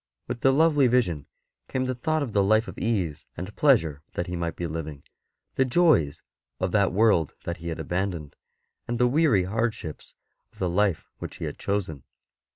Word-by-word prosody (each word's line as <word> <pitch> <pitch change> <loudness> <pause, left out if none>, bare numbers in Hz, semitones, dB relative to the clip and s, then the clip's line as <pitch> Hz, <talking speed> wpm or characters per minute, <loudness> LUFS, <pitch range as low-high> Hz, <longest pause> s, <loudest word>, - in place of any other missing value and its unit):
With 120 - -4
the 135 - +5
lovely 145 -1 +4
vision 90 - +1 0.4
came 130 0 -1
the 130 - -1
thought 155 +5 0
of 120 -6 -5
the 100 - +4
life 110 +3 +3
of - - -8
ease 95 -10 -1
and 95 +4 -6
pleasure 80 - +3
that 85 - -2
he 90 0 -4
might 85 -1 -2
be 85 - -4
living, 80 -3 -5 0.5
the 130 - +5
joys 130 - +3 0.4
of 95 -1 -1
that 100 -2 +3
world 95 -6 +3
that 85 - -4
he 85 0 -8
had 80 - -4
abandoned, 90 -5 -3 0.5
the 120 +1 +2
weary 135 - +3
hardships 110 -4 -3 0.4
of - - -24
the 90 - -1
life 100 -2 +1
which - - -7
he - - -5
had - - -6
chosen. 95 -8 -2
100 Hz, 180 wpm, -26 LUFS, 85-125 Hz, 0.5 s, the